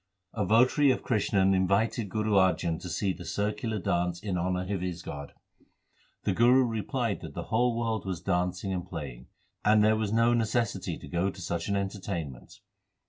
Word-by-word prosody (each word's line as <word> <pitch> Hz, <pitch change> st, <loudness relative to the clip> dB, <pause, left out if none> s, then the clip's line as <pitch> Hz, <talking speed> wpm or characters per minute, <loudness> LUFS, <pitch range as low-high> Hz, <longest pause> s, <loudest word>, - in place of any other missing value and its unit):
A 105 Hz, -, -1 dB
votary 130 Hz, +6 st, +5 dB
of 130 Hz, -, +1 dB
Krishan 100 Hz, -4 st, +2 dB
invited 100 Hz, +3 st, +1 dB
Guru 110 Hz, +2 st, -1 dB
Arjan 90 Hz, -4 st, +2 dB
to 90 Hz, -, -6 dB
see 95 Hz, +3 st, 0 dB
the 90 Hz, -, -9 dB
circular 105 Hz, +3 st, -2 dB
dance 90 Hz, -2 st, -1 dB
in 100 Hz, -1 st, -3 dB
honour 90 Hz, +2 st, -1 dB
of 95 Hz, -, -2 dB
his 90 Hz, -2 st, -4 dB
god. 70 Hz, 0 st, -7 dB, 0.9 s
The -, -, +1 dB
Guru 125 Hz, +3 st, +5 dB
replied 115 Hz, 0 st, -2 dB
that 80 Hz, -4 st, -9 dB
the -, -, -3 dB
whole 120 Hz, +1 st, +2 dB
world 115 Hz, -3 st, -1 dB
was 95 Hz, -4 st, -2 dB
dancing 90 Hz, +1 st, -1 dB
and 90 Hz, -1 st, -2 dB
playing, 70 Hz, -9 st, -7 dB, 0.4 s
and 105 Hz, 0 st, +5 dB
there 110 Hz, +1 st, +4 dB
was 110 Hz, -2 st, -1 dB
no 115 Hz, +2 st, +4 dB
necessity 115 Hz, -1 st, 0 dB
to -, -, -11 dB
go 85 Hz, +6 st, 0 dB
to 95 Hz, -, -9 dB
such 85 Hz, -1 st, -3 dB
an 100 Hz, -, +1 dB
enter 100 Hz, +1 st, -2 dB
tainment. 85 Hz, -10 st, -6 dB
100 Hz, 185 wpm, -29 LUFS, 90-110 Hz, 0.9 s, votary